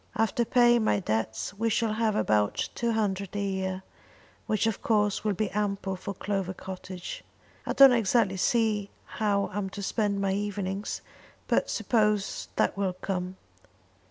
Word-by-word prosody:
After 225 +2 +1
paying 240 -1 +4
my 215 - +2
debts 110 - -2
we 225 +3 0
shall 220 0 +1
have 220 -1 +1
about 105 - +1
two 235 -1 -1
hundred 200 -3 -1
a - - -1
year, 190 -1 -2 0.6
which 215 -1 +1
of 225 -3 -1
course 210 -2 +1
will 210 -2 0
be 210 +2 -1
ample 195 -2 -1
for 200 +2 -6
Clover 195 -2 -2
Cottage. 185 -1 -7 0.4
I - - 0
don't 275 -1 +9
exactly 220 -3 +2
see 215 -1 +1 0.2
how 200 -2 0
I'm 200 -1 -2
to 200 +1 -7
spend 205 -1 0
my 195 -1 +1
evenings, 200 0 -3 0.5
but - - +2
I - - -22
suppose 210 -4 0
that - - +1
will 195 -2 -1
come. 185 0 -4
200 Hz, 155 wpm, -28 LUFS, 190-215 Hz, 0.6 s, don't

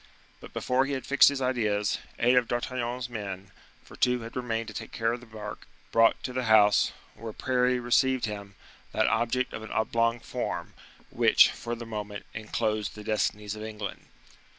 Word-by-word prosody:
But - - -12
before 130 +1 +1
he 140 - -2
had 130 - -3
fixed 140 - +7
his 140 -2 -2
ideas, 105 -5 0 0.2
eight 120 +2 +4
of 125 -2 +4
D'Artagnan's 120 0 -2
men, 100 -4 -6 0.3
for - - -14
two 125 -1 +2
had 115 +1 -9
remained 115 -3 -2
to - - -9
take 110 - -7
care 115 0 0
of 120 - -4
the 125 - -15
bark, 105 -2 -8 0.2
brought 115 0 +4
to 125 - -4
the 130 -1 -1
house, 105 -2 +5 0.2
where 115 0 -7
Parry 125 0 +1
received 125 +1 +2
him, 100 -2 -6 0.4
that - - +2
object 125 +2 +1
of - - -5
an 110 - -8
oblong 115 +1 +1
form, - - -4 0.4
which, - - +6
for 120 0 -5
the 115 0 -8
moment, 105 -2 -6
inclosed 110 -1 -2
the 105 - -9
destinies 105 -1 -1
of 105 - -8
England. 105 -2 -6
115 Hz, 180 wpm, -28 LUFS, 105-125 Hz, 0.4 s, fixed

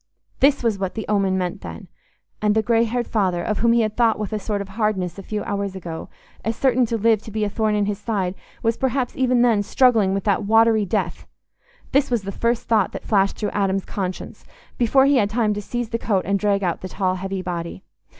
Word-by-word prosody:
This 280 -1 +4
was 220 -4 +1
what 190 -1 -3
the 220 - -4
omen 195 -2 +1
meant, 180 -1 -3
then! - - -8 0.5
And 210 0 +2
the 220 - +2
grey 230 +1 +3
haired 240 +1 -1
father, 185 -5 0
of 215 - -1
whom 235 0 +3
he 235 0 +4
had 215 -1 -1
thought 230 -2 +3
with 210 -1 -4
a 215 - -1
sort 205 0 -2
of 200 0 -6
hardness 195 -4 -1
a - - -5
few 210 +2 -4
hours 200 -1 -3
ago, 170 -3 -7 0.3
as 225 +1 -1
certain 255 -1 +2
to 230 - -1
live 220 -1 +3
to - - -10
be 215 0 -2
a 210 - 0
thorn 215 -1 0
in 205 -1 +1
his 205 0 -2
side 200 -5 -1 0.3
was 230 0 +1
perhaps 260 -1 -1
even 255 -2 +2
then 230 -4 +3
struggling 215 -3 +3
with 195 - -2
that 200 -2 +1
watery 220 0 +4
death! 180 -3 -2 0.6
This 280 +1 +2
was 240 -4 0
the 195 - -4
first 235 +3 -1
thought 215 -4 +2
that - - -7
flashed 200 -2 +2
through 210 - -2
Adam's 195 -1 0
conscience, 185 -2 -5 0.4
before 265 +3 +4
he 280 0 +4
had 205 -4 +2
time 215 -1 +1
to 210 - -4
seize 240 +2 -4
the 230 - -2
coat 200 -5 0
and 200 +1 +1
drag 200 -1 +1
out 175 -2 -1
the 185 - -6
tall 185 0 0
heavy 190 0 -4
body. 170 +1 -5
210 Hz, 235 wpm, -22 LUFS, 195-230 Hz, 0.6 s, This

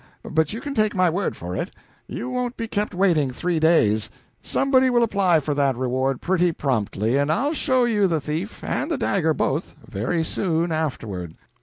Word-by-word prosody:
But 160 -1 +1
you 225 - -5
can 285 - -4
take 215 -5 +1
my 185 -2 +3
word 185 +3 -2
for 90 +1 -5
it - - -3 0.4
you 235 - -5
won't 250 -1 -3
be 230 - -3
kept 210 -3 -2
waiting 170 -7 +3
three 170 +6 -1
days. 110 -10 +3 0.3
Somebody 265 -1 +2
will 240 -1 +3
apply 195 -7 +3
for 150 0 -2
that 140 -2 +1
reward 130 +1 -1
pretty 180 -1 +2
promptly, 115 -4 0
and 145 +2 +1
I'll 275 - +1
show 260 -4 +2
you 210 -4 +2
the 165 -3 0
thief 155 +9 -5
and 295 - -2
the 325 - 0
dagger 160 - +1
both 150 +6 -1
very 125 - -1
soon 170 0 -1
afterward." 110 - -3
165 Hz, 185 wpm, -23 LUFS, 135-210 Hz, 0.4 s, my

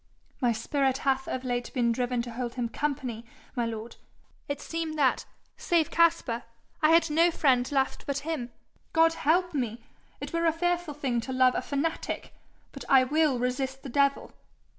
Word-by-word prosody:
'My 245 -2 +3
spirit 265 +4 0
hath 265 -1 +1
of 260 - -3
late 245 -1 -2
been 240 -2 +2
driven 245 0 -1
to 240 - -7
hold 240 0 -4
him 240 -2 -2
company, 255 -5 -3 0.3
my 240 -2 0
lord. 225 0 -6 0.5
It 285 -1 -3
seemed 325 0 -4
that, 270 -4 +2 0.3
save 335 -3 +1
Caspar, 330 -8 +2 0.4
I 310 - +5
had 330 -1 +4
no 330 +3 +5
friend 260 -6 +2
left 270 -2 0
but 280 -1 -1
him. 290 -7 -3 0.4
God 325 0 +5
help 350 +3 +1
me! 240 -5 -3 0.4
it - - -7
were 335 0 +1
a 325 - +3
fearful 350 -2 -1
thing 255 -5 -1
to 260 - -6
love 255 -1 +4
a - - -1
fanatic! 295 +3 -3 0.4
But - - -9
I 265 -1 +7
will 295 0 +2
resist 260 +2 -2
the 275 - -6
devil.' 280 +2 +1
270 Hz, 175 wpm, -28 LUFS, 245-315 Hz, 0.5 s, I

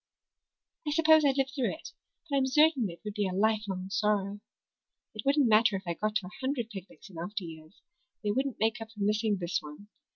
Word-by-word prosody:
I - - +1
suppose 315 0 +6
I'd 275 -1 +3
live 270 0 +1
through 265 -2 -1
it, - - -11 0.4
but 285 - -1
I'm 270 -1 +2
certain 290 - +4
it 170 - -11
would 210 - -4
be 205 -1 0
a 185 - -3
lifelong 200 -2 0
sorrow. 205 0 0 0.7
It - - -6
wouldn't 280 -1 +3
matter 215 -1 +5
if 190 - -4
I 170 - -1
got 215 +4 -2
to 215 -3 0
a 180 - -9
hundred 260 -4 -2
picnics 195 +1 -10
in 165 - -9
after 195 +3 -4
years; 160 +2 -11 0.4
they 205 - +1
wouldn't 265 +3 -1
make 225 +2 +1
up 225 - -7
for 210 -3 -5
missing 210 0 +1
this 175 0 -1
one. 150 +7 -11
215 Hz, 215 wpm, -30 LUFS, 195-265 Hz, 0.7 s, suppose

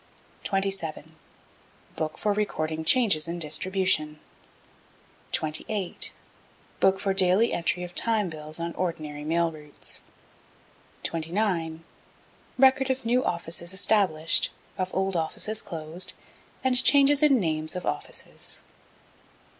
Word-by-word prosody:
27. 195 -5 -2 0.8
Book 155 -1 -3
for 210 -1 +1
recording 160 -6 -2
changes 170 -5 +4
in 170 +1 -3
distribution. 160 -1 +1 1.1
28. 175 +5 -2 0.7
Book 190 0 +4
for 195 0 0
daily 190 +4 +4
entry 175 +1 0
of 175 0 -7
Time 220 -2 +1
Bills 155 -1 -5
on 170 0 -3
ordinary 155 -5 -4
mail 165 +2 +1
routes. 150 -2 -8 1.0
29. 165 -1 -1 0.7
Record 265 0 +5
of 260 -1 -1
new 245 +3 +2
offices 170 +1 -3
established, 190 -6 +2 0.3
of 185 -1 -2
old 190 0 -1
offices 210 +6 -1
closed, 165 0 -2 0.5
and 260 0 +3
changes 285 0 +6
in 285 -4 +5
names 155 -3 -1
of 180 - -4
offices. - - -4
180 Hz, 105 wpm, -27 LUFS, 160-205 Hz, 1.1 s, changes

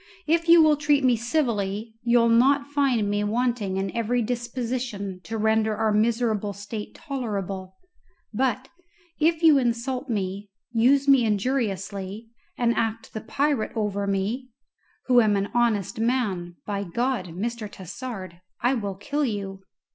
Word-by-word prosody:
If 335 +2 +1
you 335 -1 +9
will 305 -1 +4
treat 295 -2 +2
me 250 -2 +4
civilly 225 -4 -1
you'll 235 -1 +4
not 270 +5 +4
find 265 -7 +2
me 205 0 0
wanting 220 -3 0
in 195 +1 -3
every 235 +1 +1
disposition 235 -4 -3
to 225 +5 -4
render 220 0 +2
our 220 -1 +2
miserable 220 -2 +1
state 205 +1 -7
tolerable; 200 - -4 0.6
but 260 +2 0 0.5
if 325 +1 +2
you 310 -4 +7
insult 250 +2 -1
me, 200 -1 -3 0.2
use 265 +4 +3
me 270 -3 +6
injuriously, 210 -2 -2 0.3
and 235 -1 +2
act 225 0 -2
the 220 - -4
pirate 280 0 0
over 205 -2 -1
me, 205 +7 -1 0.6
who 250 -2 +5
am 215 -2 +3
an 200 0 -1
honest 230 -2 +1
man, 210 -8 -1
by 200 -1 -2
God, 235 +2 -1
Mr. 220 +1 -4
Tassard, 185 -2 -8 0.2
I 245 +2 +2
will 205 -6 -3
kill 290 +9 -2
you." 200 -6 -3
230 Hz, 140 wpm, -25 LUFS, 200-255 Hz, 0.6 s, you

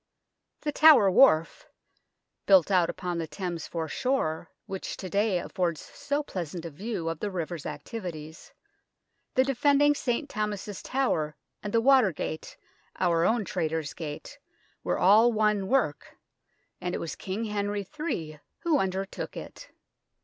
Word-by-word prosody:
The 295 - -1
Tower 285 -11 +7
Wharf, 165 -7 +4 0.8
built 190 -1 +6
out 180 -3 +4
upon 175 -1 -3
the 165 - -3
Thames 175 -2 -5
foreshore, 165 - -2 0.2
which 190 -1 -5
to 185 -3 -7
day 205 0 +2
affords 175 -2 -2
so 285 +1 -3
pleasant 175 - -5
a 165 - -6
view 185 +2 -4
of 165 -1 -3
the 210 - -2
river's 170 -4 -4
activities, 155 0 -7 0.8
the 260 - +5
defending 280 +2 +3
St. 275 0 -2
Thomas's 210 -3 -4
Tower 160 - -1 0.3
and 205 - -5
the 230 - +3
Water 255 -5 +5
Gate 155 0 -6 0.4
our 170 -1 +2
own 225 -2 +2
Traitors' 160 -4 -2
Gate 150 -3 -7 0.4
were - - 0
all 215 +6 +6
one 210 -3 +1
work, 245 - 0 0.6
and 180 0 -2
it - - -3
was 165 - -5
King 195 +4 -4
Henry 205 -1 -2
III 160 - -3 0.2
who 320 -4 +2
under 190 -1 -1
took - - -7
it. - - -9
190 Hz, 140 wpm, -28 LUFS, 165-230 Hz, 0.8 s, Tower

